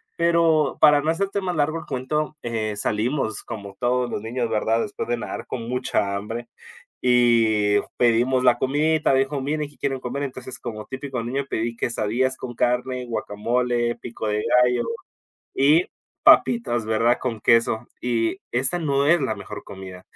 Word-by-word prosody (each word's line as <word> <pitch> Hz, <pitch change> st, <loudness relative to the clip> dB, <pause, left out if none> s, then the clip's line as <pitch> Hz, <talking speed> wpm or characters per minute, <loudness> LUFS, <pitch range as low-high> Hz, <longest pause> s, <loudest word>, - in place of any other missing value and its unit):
pero 165 Hz, -3 st, +2 dB
para 150 Hz, -1 st, +6 dB
no 155 Hz, -, -1 dB
hacerte 200 Hz, +4 st, -1 dB
más 180 Hz, -3 st, -2 dB
largo 155 Hz, +2 st, +1 dB
el -, -, -11 dB
cuento, 150 Hz, +4 st, -2 dB
eh, 110 Hz, -3 st, -3 dB
salimos, 110 Hz, +1 st, -1 dB
como 100 Hz, -4 st, -8 dB
todos 125 Hz, 0 st, 0 dB
los -, -, -4 dB
niños, 120 Hz, +1 st, -2 dB
¿verdad? 110 Hz, +1 st, +1 dB
Después -, -, -5 dB
de 120 Hz, -, +1 dB
nadar 115 Hz, -, -6 dB
con 115 Hz, -3 st, -5 dB
mucha 120 Hz, -5 st, -1 dB
hambre, 115 Hz, +4 st, -5 dB, 0.5 s
y 115 Hz, -4 st, +3 dB, 0.2 s
pedimos 125 Hz, +2 st, +3 dB
la 125 Hz, -1 st, +4 dB
comidita, 150 Hz, +3 st, +2 dB
dijo: 135 Hz, +1 st, +1 dB
"Miren, 150 Hz, +2 st, -2 dB
¿qué 145 Hz, -, -22 dB
quieren 135 Hz, -2 st, -2 dB
comer?". 135 Hz, +3 st, -3 dB
Entonces, 130 Hz, -1 st, -6 dB
como 110 Hz, -1 st, -6 dB
típico 130 Hz, -2 st, -5 dB
niño, 135 Hz, +4 st, -3 dB
pedí 115 Hz, +1 st, -2 dB
quesadillas 120 Hz, +3 st, 0 dB
con 120 Hz, -2 st, -7 dB
carne, 125 Hz, +1 st, 0 dB
guacamole, 120 Hz, +2 st, -1 dB
pico 115 Hz, -2 st, -6 dB
de 105 Hz, 0 st, 0 dB, 0.2 s
gallo 125 Hz, 0 st, +1 dB, 0.7 s
y 150 Hz, +6 st, +4 dB, 0.4 s
papitas, 120 Hz, -, +4 dB
¿verdad? 115 Hz, +2 st, +2 dB
Con 120 Hz, -4 st, -3 dB
queso, 115 Hz, +1 st, +2 dB
y 120 Hz, +7 st, 0 dB
esa 130 Hz, +8 st, +1 dB
no 140 Hz, -3 st, +1 dB
es 170 Hz, 0 st, +4 dB
la 130 Hz, -, -1 dB
mejor -, -, -8 dB
comida, 95 Hz, -2 st, -10 dB
125 Hz, 160 wpm, -23 LUFS, 115-140 Hz, 0.7 s, para